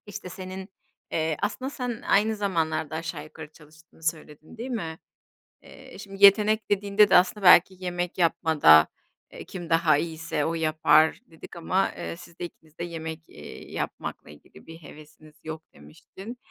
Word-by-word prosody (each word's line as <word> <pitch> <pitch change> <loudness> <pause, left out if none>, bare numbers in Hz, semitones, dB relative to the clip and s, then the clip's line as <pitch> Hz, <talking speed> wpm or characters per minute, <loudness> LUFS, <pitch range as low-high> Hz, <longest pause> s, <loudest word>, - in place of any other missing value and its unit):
işte, 195 -2 -8
senin, 185 +1 -8 0.4
eee, 160 -1 -1
aslında 260 +5 -2
sen 245 -5 -5
aynı 215 +2 +2
zamanlarda 160 -6 -2
aşağı 165 +1 -5
yukarı 155 0 -12
çalıştığını 155 +1 -20
söyledin, 155 +3 -5
değil 245 +4 -6
mi? 165 -9 -4 0.7
Eee, - - -14
şimdi 195 0 -8
yetenek 215 +2 +4
dediğinde 205 0 +3
de - - +5
aslında 185 +3 +3
belki 180 +1 +7
yemek 175 -1 -4
yapmada, 160 - +5 0.4
eee, - - -10
kim 175 -3 -9
daha 165 -3 +3
iyiyse 165 0 -3
o 165 - -1
yapar 155 0 +3
dedik 165 -3 -14
ama, 185 +3 0
eee, - - -5
siz 175 -1 -15
de 175 - -3
ikiniz 160 -2 -15
de 170 - -5
yemek, 160 -1 -6
eee, 75 - -12
yapmakla - - -6
ilgili 75 - -17
bir 165 0 -10
hevesiniz 155 -1 -15
yok 160 0 -7
demiştin. 190 - -12
165 Hz, 155 wpm, -26 LUFS, 160-195 Hz, 0.7 s, belki